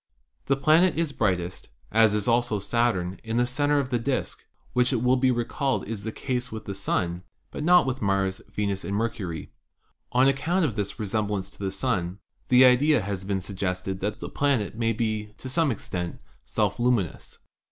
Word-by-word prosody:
The 135 - +3
planet 155 +4 +4
is 165 -3 0
brightest, 90 - -1 0.2
as 110 -1 +5
is 105 -1 -1
also 120 -2 +2
Saturn, 100 -4 0
in 115 0 -2
the 120 - +3
center 145 +4 +1
of 140 -2 0
the 120 - +1
disk, 130 +2 -3 0.3
which 125 +1 +3
it 120 -3 0
will 125 +1 +4
be 130 0 +3
recalled 125 +2 -1
is 110 -2 -4
the 110 +2 -4
case 125 +1 -3
with 110 0 -7
the 100 - -4
Sun, 90 -3 -1 0.3
but - - -5
not 180 +2 +6
with 130 0 -2
Mars, 95 -1 0
Venus 100 -2 -2
and 100 - -3
Mercury. 100 -8 -3 0.6
On 130 +2 +4
account 165 +7 +2
of 120 -8 -2
this 105 +1 -3
resemblance 105 -2 -2
to - - -17
the 100 - -3
■ 95 - -1
Sun, 95 -4 -1 0.3
the 125 +1 +7
idea 130 +3 +5
has 100 -2 -4
been 95 0 -1
sug 95 +1 -7
gested 95 0 -2
that 105 +2 -3
the - - -5
planet 135 -8 0
may 115 0 +1
be, 110 -2 -2
to - - -8
some 150 +4 +2
extent, 90 -6 -4 0.3
self - - 0
luminous. 120 - 0
115 Hz, 195 wpm, -26 LUFS, 100-130 Hz, 0.6 s, the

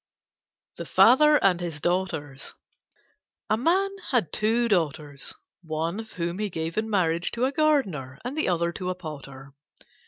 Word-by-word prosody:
THE - - -6
FATHER 300 +6 +6
AND 180 -3 +4
HIS 165 -4 -4
DAUGHTERS 160 -5 -2 1.0
A - - +5
Man 360 - +2 0.2
had 240 - +1
two 230 +3 +2
Daughters, 150 -7 -1 0.3
one 165 +3 -3
of 220 -1 -9
whom 170 +1 -3
he 210 -1 -1
gave 165 -1 -4
in 220 +1 -1
marriage 170 -4 +1
to 240 +2 +1
a 265 - 0
gardener, 205 - 0
and 255 +3 -4
the 310 - 0
other 170 -1 +1
to 180 +1 -4
a 185 - -2
potter. 140 -5 -9
180 Hz, 155 wpm, -26 LUFS, 160-225 Hz, 1.0 s, FATHER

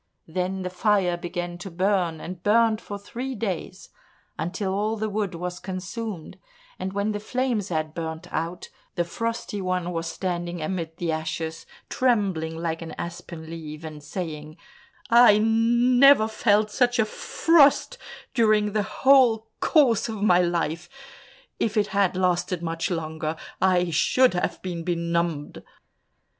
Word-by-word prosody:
Then 185 +3 -2
the 180 - -4
fire 185 -1 +2
began 175 0 -5
to 195 - -7
burn, 180 -2 0
and 180 +1 -7
burnt 220 +1 +3
for 205 - -6
three 250 +6 -6
days 200 -7 -4 0.5
until 185 +4 -3
all 215 +3 -1
the 215 0 -2
wood 200 -3 -2
was 180 +1 -5
consumed, 190 -1 -6 0.4
and 185 +1 -3
when 200 +2 -1
the 205 - -3
flames 235 -2 -1
had 155 -2 -2
burnt 160 -1 -5
out, 165 +3 -3 0.3
the 175 - +1
Frosty 230 +3 -4
One 180 -1 -1
was 165 -1 -3
standing 175 -2 -3
amid 165 0 -4
the 170 -2 -1
ashes, 160 +1 -4 0.2
trembling 195 -10 0
like 165 0 -3
an 165 - -7
aspen 170 -1 -7
leaf, 160 -1 -8
and 155 -2 -8
saying, 155 -1 -6 0.5
"I 235 -3 +8
never 235 +3 +5
felt 215 -1 +2
such 245 0 +2
a 220 - +3
frost 325 - +3 0.3
during 215 -3 +3
the 215 - +2
whole 225 0 +4
course 240 - +3
of 215 -2 -4
my 180 -4 +5
life; 170 -1 -1 0.7
if 220 0 0
it 205 -1 +3
had 195 -2 +2
lasted 180 -1 0
much 165 0 -2
longer, 160 -2 -3 0.3
I 180 -2 +3
should 255 +10 +3
have 180 - -2
been 175 -3 -4
benumbed!" 170 -3 -2
185 Hz, 145 wpm, -25 LUFS, 170-215 Hz, 0.7 s, I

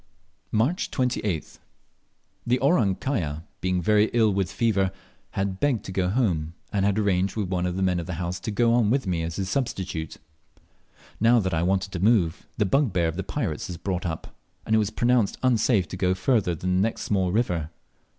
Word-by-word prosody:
March 125 - +1
28th. 110 - -2 0.9
The 125 +1 +3
"Orang 125 - +3
kaya" 85 - -2 0.2
being 90 -1 0
very 105 +3 +4
ill 110 -3 +3
with 95 -2 -1
fever 100 -5 +1 0.4
had 95 -1 -2
begged 140 -6 +1
to - - -6
go 95 -1 0
home, 85 -8 0 0.2
and 100 -1 +1
had 100 0 +2
arranged 95 -2 +1
with 105 -5 -2
one 90 -1 0
of 90 - -3
the 95 - -1
men 90 -2 +1
of 85 - -5
the 90 - -3
house 85 +1 -3
to - - -5
go 115 +2 +2
on 120 -3 +3
with 130 +1 +1
me 90 -3 -1
as 80 0 -4
his 95 -2 -2
substitute. 95 - -3 1.0
Now 115 +2 +5
that 95 -4 -1
I 80 - +1
wanted 95 +2 0
to 90 - -4
move, 95 -5 +2
the 105 - +2
bugbear 100 - +2
of 80 - -5
the 95 - -2
pirates 95 - -3
was 90 - -6
brought 90 0 -2
up, 80 -1 -6 0.3
and 110 - -1
it - - +5
was 105 -2 +1
pronounced 120 -3 +1
unsafe 115 -6 +3
to 95 - -6
go 90 0 +1
further 95 -3 +1
than 90 +3 -1
the - - +3
next 110 +2 -1
small 95 -3 +1
river. 90 -8 0
95 Hz, 200 wpm, -25 LUFS, 90-115 Hz, 1.0 s, Now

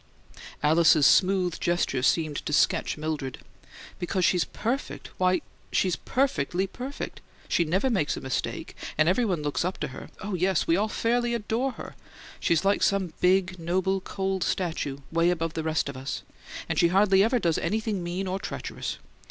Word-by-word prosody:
Alice's 155 -1 +5
smooth 185 -3 +4
gesture 175 -7 0
seemed 150 +2 +1
to 150 - -2
sketch 155 - +2
Mildred. 150 -4 -3 0.6
"Because 180 +1 0
she's 180 -2 +3
perfect 255 +5 -4
why, 185 0 +3 0.3
she's 185 -3 +2
PERFECTLY 190 - 0
perfect! 255 +8 -6 0.3
She 170 - +2
never 190 +10 +1
makes 195 - 0
a - - -3
mistake, 130 -1 -3 0.2
and 155 +1 +4
everybody 185 -4 +1
looks 145 +2 -1
up 180 +2 -2
to 150 - -3
her 130 - -9
oh, 205 +1 -5
yes, 185 0 +1
we 165 - +3
all 205 +4 +1
fairly 240 +2 +1
adore 235 +4 -1
her! - - -9 0.4
She's 170 +2 +1
like 200 +1 +3
some 190 -4 +1
big, 185 0 +2
noble, 185 +3 0
cold 190 -1 -2
statue 160 -6 -2
'way 165 +1 +3
above 165 -2 -1
the 160 - -2
rest 160 -2 0
of 140 - -5
us 130 +1 -5 0.4
and - - -1
she 170 - +6
hardly 190 +2 +4
ever 235 +4 +2
does 170 -8 +1
anything 210 +2 -1
mean 175 +3 -3
or 190 +1 -2
treacherous. - - -5
180 Hz, 170 wpm, -27 LUFS, 160-195 Hz, 0.6 s, she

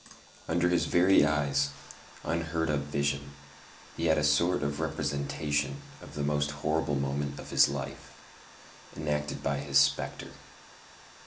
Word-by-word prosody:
Under 85 +2 +2
his 90 - +2
very 90 -1 +5
eyes, 70 -2 +1 0.5
unheard 80 -1 -1
of 70 -1 -1
vision, 70 -1 -2 0.6
he 85 - -1
had 80 - +4
a 75 - +1
sort 75 +3 +3
of 70 0 -2
representation 75 -2 -2 0.2
of - - -12
the 75 - -2
most 75 0 +1 0.2
horrible 75 -2 +1
moment 70 +1 -2
of - - -9
his - - +6
life, - - -6 0.9
enacted 75 0 -2
by 70 0 0
his 70 -1 +1
spectre. 70 0 +1
75 Hz, 135 wpm, -29 LUFS, 70-80 Hz, 0.9 s, his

